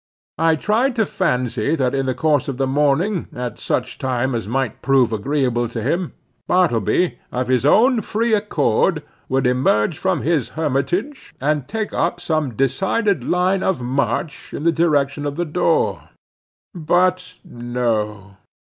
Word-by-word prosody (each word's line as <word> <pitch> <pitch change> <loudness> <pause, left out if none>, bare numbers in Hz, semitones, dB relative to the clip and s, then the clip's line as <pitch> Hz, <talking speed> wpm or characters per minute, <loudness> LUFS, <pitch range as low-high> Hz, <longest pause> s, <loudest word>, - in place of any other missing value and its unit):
I 165 0 +4
tried 230 - +1
to 220 -3 +2
fancy 125 - 0
that 130 -4 0
in 135 -1 -1
the 130 - 0
course 150 -3 +1
of 135 -3 -4
the 135 - +1
morning, 150 +8 +1
at 125 -1 -5
such - - -2
time 130 0 -1
as 115 -3 -3
might 130 0 -2
prove 130 -4 +3
agreeable 120 0 0
to 115 - -5
him, 165 +10 -1 0.3
Bartleby, 175 - +1
of 125 0 -2
his 130 +1 +2
own 235 - +4
free 225 +3 -1
accord, 200 - +1 0.3
would 135 0 +1
emerge 125 +1 +2
from 185 -5 0
his 155 -4 0
hermitage, 160 - -2
and 145 -1 0
take 220 +3 -3
up 170 - 0
some 155 -7 -1
decided 170 - +1
line 185 +5 +1
of 190 -5 0
march 140 +4 -2
in - - -5
the 170 - +4
direction 145 -4 +1
of 145 - -4
the 175 - -1
door. 175 +3 0 0.6
But 180 +2 +1
no. 110 - -3
145 Hz, 150 wpm, -20 LUFS, 125-180 Hz, 0.6 s, I